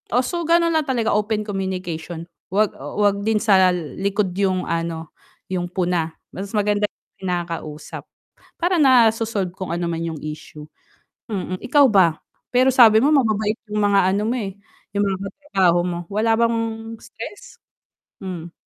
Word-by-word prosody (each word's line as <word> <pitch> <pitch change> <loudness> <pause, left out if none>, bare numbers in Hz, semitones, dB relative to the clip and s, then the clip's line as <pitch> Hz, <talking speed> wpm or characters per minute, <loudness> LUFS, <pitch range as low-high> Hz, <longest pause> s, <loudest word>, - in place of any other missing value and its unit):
Oh, 250 +3 +2
so 345 +4 -2
gano'n 335 0 +3
lang 315 -2 +1
talaga 240 -4 +1
open 210 0 0
communication 180 -4 -4 0.2
huwag, 205 +2 +2
oh, 145 +2 -7
huwag 200 -1 +2
din 220 +1 +1
sa 195 -4 +5
likod 190 +4 -2
'yong 185 -1 0
ano 165 -1 -3 0.4
'yong 175 -1 -2
puna 175 -3 0 0.2
mas 195 +1 -6
maganda 210 0 +2 0.3
kinakausap 170 -4 -4 0.6
para 350 -1 +1
naso-solve 225 -7 +3
kung 185 -2 -6
ano 170 +1 -2
man 165 -1 -2
yung 165 -1 -3
issue, 150 0 -8 0.6
mm. 185 -4 -4
Ikaw 290 +2 +4
ba 175 -6 +4 0.3
pero 255 +1 +5
sabi 225 -4 +7
mo 290 - +4
mababait 220 -6 +2
'yong 210 0 -1
mga 200 -1 +4
ano 200 - 0
mo, 245 - 0
eh, 200 -5 -4 0.4
'yong 205 - +2
mga 195 -2 0
katrabaho 195 - +1
mo 175 -1 -2
wala 215 +4 +1
bang 230 0 +2 0.4
stress? 410 - -10 0.6
Hm. 175 -3 -6
200 Hz, 150 wpm, -21 LUFS, 175-225 Hz, 0.6 s, sabi